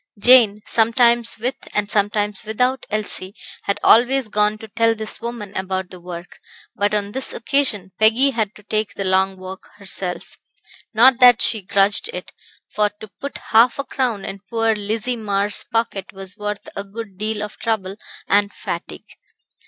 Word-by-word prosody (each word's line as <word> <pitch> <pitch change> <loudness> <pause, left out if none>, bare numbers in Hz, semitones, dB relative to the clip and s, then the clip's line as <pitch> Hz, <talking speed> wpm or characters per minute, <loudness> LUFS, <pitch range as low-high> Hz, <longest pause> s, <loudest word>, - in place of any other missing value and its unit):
Jane, 220 -2 +6
sometimes 235 +1 +3
with 245 +4 -2 0.2
and 205 -1 0
sometimes 205 0 0
without 250 +4 -1
Elsie, 205 -2 -3 0.3
had 200 - -1
always 250 +1 +4
gone 210 0 +1
to 220 - -11
tell 230 +1 +1
this 220 +1 -6
woman 230 -4 -6
about 190 -1 -3
the 185 - -10
work, 175 0 -9 0.4
but 205 +1 0
on 205 -1 -2
this 265 +4 -2
occasion 230 -7 +1
Peggy 230 +6 +4
had 220 -5 -2
to 210 - -16
take 215 +1 -2
the 195 - -3
long 190 0 +1
walk 185 +1 -10
herself 190 -3 -6 0.5
not 245 +3 +5
that 245 -2 +7
she 220 - +4
grudged 195 - +1
it - - -7 0.4
for 210 0 +1
to 215 - -10
put 280 - -6
half 230 +3 +5
a 280 - -2
crown 245 -8 -2
in 195 0 -6
poor 225 -1 +1
Lizzie 215 +4 -2
Marr's 205 -2 0
pocket 225 -4 -2
was 195 0 -4
worth 210 0 -5
a 200 - -3
good 200 -1 -9
deal 215 0 -2
of 210 - -8
trouble 200 -4 -2 0.3
and 205 0 +2
fatigue. - - -7
210 Hz, 165 wpm, -20 LUFS, 200-230 Hz, 0.5 s, that